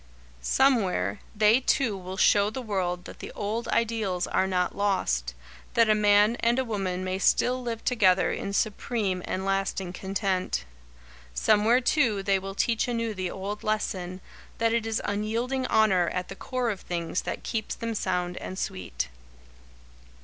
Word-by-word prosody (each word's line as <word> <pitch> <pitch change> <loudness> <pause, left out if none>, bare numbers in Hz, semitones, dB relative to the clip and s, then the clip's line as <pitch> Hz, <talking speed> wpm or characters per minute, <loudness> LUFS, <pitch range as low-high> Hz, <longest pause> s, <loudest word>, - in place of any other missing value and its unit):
Somewhere, 185 - +2 0.2
they 215 +3 +5
two 245 -4 +1
will 185 0 -7
show 205 0 +4
the 225 - -5
world 180 -5 -2
that - - -10
the - - -7
old 215 +3 -3
ideals 220 -6 0
are 190 - +1
not 180 -1 0
lost; 65 - 0 0.4
that 230 -2 +5
a - - +7
man 210 +2 +4
and 235 +1 +2
a 260 - +1
woman 190 -5 -2
may 185 0 -2
still 250 +5 +2
live 230 -2 -5
together 195 -7 +3
in 200 - -3
supreme 205 -2 -1
and 190 +1 -3
lasting 195 -2 -1
content. 190 - -1 0.7
Somewhere, 220 - +4
too, 240 -8 +2
they 195 -1 +2
will 195 +1 -7
teach 230 +3 +1
anew 230 -2 -1
the 185 -2 -3
old 200 +3 -5
lesson, 185 -4 -2 0.4
that 230 0 +2
it 230 -1 0
is 225 0 -1
unyielding 230 +6 -1
Honour 190 -6 +3
at 180 0 -4
the - - -6
core 250 -2 -2
of 195 - -6
things 170 0 -2
that - - -5
keeps 220 -2 -3
them 230 -1 -3
sound 180 -4 -1
and 185 - -6
sweet. 85 - -3
205 Hz, 160 wpm, -27 LUFS, 185-230 Hz, 0.7 s, a